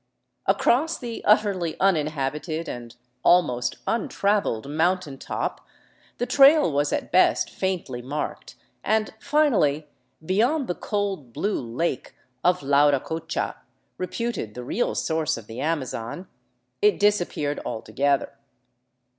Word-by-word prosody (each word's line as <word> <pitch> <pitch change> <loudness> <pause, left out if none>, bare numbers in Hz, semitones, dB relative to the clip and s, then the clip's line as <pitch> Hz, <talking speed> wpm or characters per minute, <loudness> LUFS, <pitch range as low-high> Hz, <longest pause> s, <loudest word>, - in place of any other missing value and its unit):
Across 315 +7 +2
the 235 -3 -6
utterly 200 -6 +2
uninhabited 155 -2 0
and 120 -1 -7 0.3
almost 125 -9 +3
untraveled 200 - 0
mountain 160 -1 0
top - - -4 0.5
the 245 - -1
trail 280 - +6
was 145 +1 +1
at - - -2
best 185 - +3
faintly 175 -10 -3
marked, 140 +5 -5 0.3
and 220 0 +1
finally, 215 - +2 0.4
beyond 240 - +2
the - - 0
cold, 195 - -3
blue 200 +8 -1
lake 125 +5 -3 0.3
of 180 -3 +2
Lauracocha, 145 +3 +1 0.4
reputed 185 - -3
the 125 - -6
real 225 - -1
source 160 -4 0
of 115 - -9
the 115 +3 -8
Amazon, 150 0 -3 0.5
it 420 0 +4
disappeared 175 -8 +1
alto 110 -1 -6
gether. 140 +2 +1
165 Hz, 115 wpm, -25 LUFS, 140-205 Hz, 0.5 s, trail